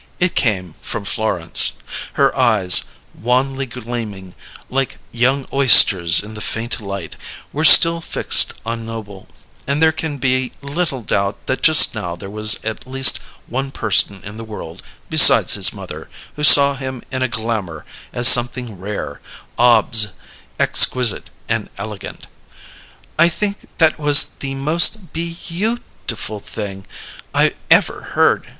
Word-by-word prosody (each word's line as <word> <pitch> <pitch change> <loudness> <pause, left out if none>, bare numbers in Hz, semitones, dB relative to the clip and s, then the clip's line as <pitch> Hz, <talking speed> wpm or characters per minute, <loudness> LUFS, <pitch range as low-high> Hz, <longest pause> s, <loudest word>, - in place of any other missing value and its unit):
It 180 0 -1
came 95 - -2
from 100 - -6
Florence. 90 -6 +1 0.4
Her - - 0
eyes, 95 -4 +3 0.3
wanly 130 +3 -3
gleaming, 110 -6 -9 0.3
like 135 0 -4
young 130 +3 -1
oysters 95 -11 +5
in 105 +2 -12
the 105 - -10
faint 115 +3 -5
light, 100 -5 -8 0.4
were 155 - -4
still 165 +1 +6
fixed - - +3
on 115 0 -6
Noble; 110 -4 -11 0.4
and 140 +2 -2
there 160 0 +3
can 160 -2 -6
be 130 -1 -2
little 140 -3 -4
doubt 100 0 -4
that 130 - -4
just 155 -2 +6
now 90 -6 -6
there 95 +3 -12
was 110 +1 +3
at 110 +3 -7
least 135 +1 +3 0.3
one 135 +3 -5
person 100 -5 -1
in 105 +2 -11
the 115 - -9
world, 110 -1 -11 0.3
besides - - +6
his - - +4
mother, - - -11 0.3
who 150 - -8
saw 140 -1 +7
him 130 -2 -8
in 130 -1 -5
a 130 - 0
glamour 110 -7 -6 0.3
as 120 0 +2
something 120 -4 +3
rare, 100 +2 -8 0.4
obs, 115 -3 +3 0.5
exquisite, 125 -5 +3 0.2
and - - -4
elegant. - - -10 0.9
"I 170 +1 +4
think 200 +4 -4
that 160 -2 +1
was 145 -1 +4 0.2
the 135 -1 -6
most 165 +6 0
be 170 +1 -6
you 210 +8 -3 0.3
tiful 110 -2 -6
thing 100 -2 -9 0.5
I - - +1 0.2
ever - - 0
heard!" - - 0
120 Hz, 140 wpm, -16 LUFS, 105-140 Hz, 0.9 s, saw